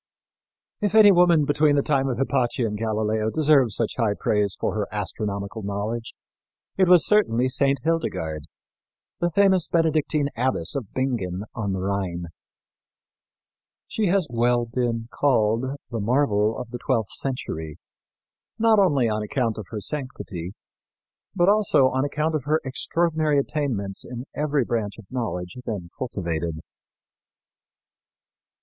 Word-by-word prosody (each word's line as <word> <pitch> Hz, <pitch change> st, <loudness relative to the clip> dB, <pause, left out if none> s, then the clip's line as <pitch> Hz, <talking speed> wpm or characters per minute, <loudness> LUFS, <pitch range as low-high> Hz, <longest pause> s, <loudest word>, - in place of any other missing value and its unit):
If 210 Hz, -1 st, -1 dB
any 210 Hz, -2 st, +8 dB
woman 175 Hz, -4 st, +4 dB
between 145 Hz, +1 st, +3 dB
the 140 Hz, -, +2 dB
time 135 Hz, -2 st, +1 dB
of 125 Hz, -, -2 dB
Hypatia 130 Hz, -2 st, 0 dB
and 105 Hz, -1 st, -2 dB
Galileo 110 Hz, 0 st, -1 dB
deserved 140 Hz, -4 st, +3 dB
such 115 Hz, -, -1 dB
high 110 Hz, -4 st, +1 dB
praise 105 Hz, -2 st, 0 dB
for -, -, -1 dB
her 105 Hz, -2 st, -2 dB
astronomical 100 Hz, +1 st, -4 dB
knowledge 105 Hz, +3 st, -4 dB, 0.6 s
it 190 Hz, -1 st, +3 dB
was 175 Hz, -3 st, +6 dB
certainly 130 Hz, -, +3 dB
Saint 135 Hz, 0 st, +1 dB
Hildegard, 80 Hz, -, -2 dB, 0.7 s
the 175 Hz, -, +1 dB
famous 190 Hz, -1 st, +3 dB
Benedictine 155 Hz, -3 st, +1 dB
abbess 125 Hz, -, 0 dB
of 125 Hz, -8 st, -4 dB
Bingen 105 Hz, -8 st, -2 dB
on 105 Hz, -4 st, -3 dB
the 95 Hz, -, -3 dB
Rhine. 95 Hz, -3 st, -3 dB, 1.6 s
She 215 Hz, -2 st, -1 dB
has 185 Hz, 0 st, +3 dB
well 120 Hz, 0 st, +2 dB
been 115 Hz, -1 st, -2 dB
called 115 Hz, -3 st, +2 dB, 0.3 s
"the 115 Hz, -, -3 dB
marvel 110 Hz, -2 st, +1 dB
of 125 Hz, -2 st, -7 dB
the 120 Hz, -, -5 dB
twelfth 120 Hz, -6 st, -1 dB
century," 80 Hz, -, -4 dB, 0.8 s
not 225 Hz, -1 st, +4 dB
only 145 Hz, -11 st, +3 dB
on 110 Hz, -1 st, -1 dB
account 115 Hz, 0 st, -1 dB
of 105 Hz, -, -8 dB
her 110 Hz, -2 st, -5 dB
sanctity, 105 Hz, -, -4 dB, 0.8 s
but 175 Hz, -1 st, +3 dB
also 200 Hz, -10 st, +4 dB
on 130 Hz, +1 st, 0 dB
account 150 Hz, +3 st, -1 dB
of 150 Hz, -4 st, -2 dB
her 155 Hz, +2 st, +2 dB
extraordinary 155 Hz, +2 st, 0 dB
attainments 130 Hz, -9 st, -2 dB
in 125 Hz, 0 st, -7 dB
every 150 Hz, -3 st, 0 dB
branch 110 Hz, -4 st, -2 dB
of 110 Hz, -, -12 dB
knowledge 110 Hz, -7 st, -4 dB
then 90 Hz, -6 st, -5 dB
cultivated. 85 Hz, -9 st, -3 dB
120 Hz, 135 wpm, -24 LUFS, 105-150 Hz, 1.6 s, any